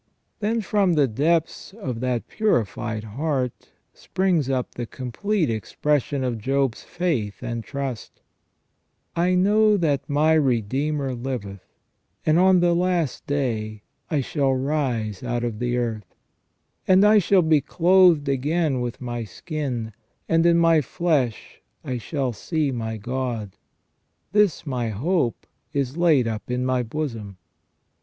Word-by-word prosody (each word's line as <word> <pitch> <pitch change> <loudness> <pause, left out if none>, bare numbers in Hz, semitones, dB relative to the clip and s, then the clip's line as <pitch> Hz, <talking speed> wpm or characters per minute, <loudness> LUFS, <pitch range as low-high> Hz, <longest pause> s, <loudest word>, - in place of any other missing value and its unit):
Then 225 +2 0
from 200 -3 +2
the 145 -4 +3
depths 160 - 0
of 135 - -5
that 125 -1 -2
purified 115 - -1
heart 130 +2 -3 0.2
springs 180 -7 0
up 130 -2 -1
the 120 -1 -5
complete 160 - -2
expression 140 +5 -1
of 120 -3 -2
Job's 135 +1 0
faith 150 - -2
and 115 -1 -3
trust: 135 -4 -5 0.5
" - - -48
I 180 0 +2
know 210 +3 +4
that 150 -7 0
my 150 +2 +3
Redeemer 135 +1 0
liveth, 120 -6 -5 0.6
and 155 +2 +4
on 185 -1 +5
the 175 0 +3
last 175 -4 0
day 110 -7 -2 0.3
I 150 -4 +1
shall 135 0 0
rise 130 -7 -1
out 120 -1 -2
of 115 -3 -3
the 125 0 0
earth; 110 -5 -3 0.7
and 190 +2 +6
I 210 0 +6
shall 190 -1 +3
be 160 -2 +3
clothed 175 -1 +4
again 140 0 0
with 120 0 -4
my 120 -1 -4
skin, 120 - -4 0.3
and 165 +1 +3
in 170 0 +5
my 165 -2 +4
flesh 145 -7 -1 0.2
I 125 -2 -3
shall 135 0 -2
see 150 - -1
my 110 -3 -3
God; 120 -3 -4 0.8
this 205 -7 +2
my 125 -5 -2
hope 130 - -1 0.3
is 140 -2 -1
laid 160 -8 +3
up 110 0 -4
in 125 +1 -1
my 130 -1 +1
bosom 115 -6 -5
135 Hz, 135 wpm, -23 LUFS, 120-165 Hz, 0.8 s, and